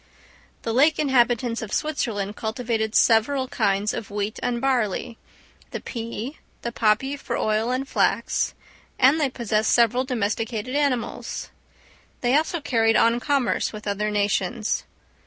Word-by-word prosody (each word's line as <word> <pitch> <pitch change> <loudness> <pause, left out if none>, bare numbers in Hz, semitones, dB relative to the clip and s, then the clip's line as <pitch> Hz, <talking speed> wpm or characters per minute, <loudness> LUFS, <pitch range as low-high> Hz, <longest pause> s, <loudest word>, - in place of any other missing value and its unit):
The 225 - -2
lake 295 +6 +4
inhabitants 245 -4 +2
of 215 -2 -6
Switzerland 215 -9 -2
cultivated 220 -1 -2
several 260 +4 +3
kinds 205 -4 0
of 215 - -5
wheat 205 +1 -3
and 245 -1 -1
barley, 240 -3 -1 0.5
the - - -5
pea, 235 +4 -6 0.2
the 235 - -2
poppy 230 +5 +1
for 280 - -4
oil 215 +2 0
and 260 +2 -1
flax; - - +1 0.4
and 275 +5 +5
they 280 - +2
possessed 220 -3 0
several 240 +1 +4
domesticated 225 0 -2
animals. 280 -5 -2 0.7
They 245 +2 +2
also 320 +2 +1
carried 225 -5 +2
on 230 +1 +4
commerce 275 -1 0
with 215 -1 -9
other 205 +1 -1
nations. 210 +2 0
235 Hz, 135 wpm, -24 LUFS, 215-260 Hz, 0.7 s, and